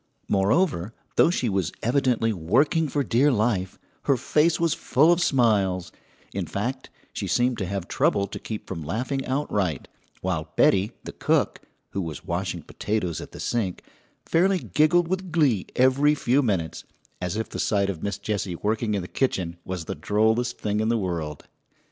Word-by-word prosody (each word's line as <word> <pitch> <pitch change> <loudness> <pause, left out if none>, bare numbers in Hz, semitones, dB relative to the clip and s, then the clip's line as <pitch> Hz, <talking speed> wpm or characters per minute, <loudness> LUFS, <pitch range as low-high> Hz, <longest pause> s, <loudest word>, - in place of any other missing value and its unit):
] - - -42
Moreover, 105 - +1 0.2
though - - +5
she 150 -8 0
was 95 -5 0
evidently 120 -3 +2
working 135 - +2
for 145 +1 0
dear 130 +4 +3
life, 105 -5 0 0.3
her 140 - +3
face 155 +6 +2
was 170 -2 +2
full 155 +6 +3
of 175 - 0
smiles; 105 - +2 0.4
in - - -3
fact, - - -3 0.2
she - - -3
seemed 120 -1 +1
to 95 - -2
have 95 -2 -3
trouble 100 -1 +2
to 100 - -7
keep 110 -2 -6
from 85 -4 -5
laughing 125 - -2
outright, 105 - -1 0.3
while 85 -4 -2
Betty, 100 +4 +3
the - - -6
cook, - - 0 0.3
who 100 - -2
was 80 -3 -6
washing - - -3
potatoes 105 -6 -2
at - - -9
the - - -10
sink, 105 -7 -2 0.4
fairly 190 +3 +3
giggled 155 - +2
with 185 0 -3
glee 140 - +2
every 135 +4 +4
few 135 0 +2
minutes, 95 - -1 0.4
as 90 +3 -2
if 110 - -3
the - - -6
sight 100 -2 +1
of 80 -4 -9
Miss 100 -1 -2
Jessie 100 -3 -2
working 105 +3 -1
in 100 - -2
the - - -7
kitchen 90 -10 -1
was 90 -3 -5
the - - -3
drollest 110 +3 +1
thing 105 0 -1
in 110 +1 +1
the 115 - +2
world. 85 -7 -3
110 Hz, 175 wpm, -25 LUFS, 95-135 Hz, 0.4 s, though